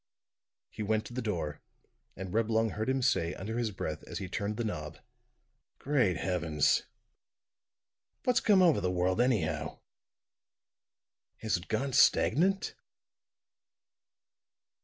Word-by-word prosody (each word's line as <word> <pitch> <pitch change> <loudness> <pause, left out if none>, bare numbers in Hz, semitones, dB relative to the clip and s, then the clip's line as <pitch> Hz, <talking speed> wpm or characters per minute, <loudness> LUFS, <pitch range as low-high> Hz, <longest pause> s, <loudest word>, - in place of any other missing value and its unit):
He - - -7
went 110 +1 0
to - - -9
the 125 - -3
door, 85 - -3 0.5
and 95 -1 -7
Reblong 110 0 +1
heard 110 +4 -3
him 130 -1 0
say, 90 -9 +1
under 110 +5 -4
his 115 -2 0
breath, 80 -6 -5
as - - -6
he 95 - -4
turned 100 +3 -3
the 120 - -1
knob: 75 -9 -4 0.8
"Great 125 - +1
Heavens! 80 -4 +1 1.4
What's 250 -2 +3
come 195 -3 +4
over 165 -5 +4
the 90 - 0
world 90 +3 +1
anyhow? 100 -11 0 1.6
Has 110 - +1
it 85 - -5
gone 130 +4 -1
stagnant?" 190 - +3
110 Hz, 120 wpm, -31 LUFS, 90-125 Hz, 1.6 s, come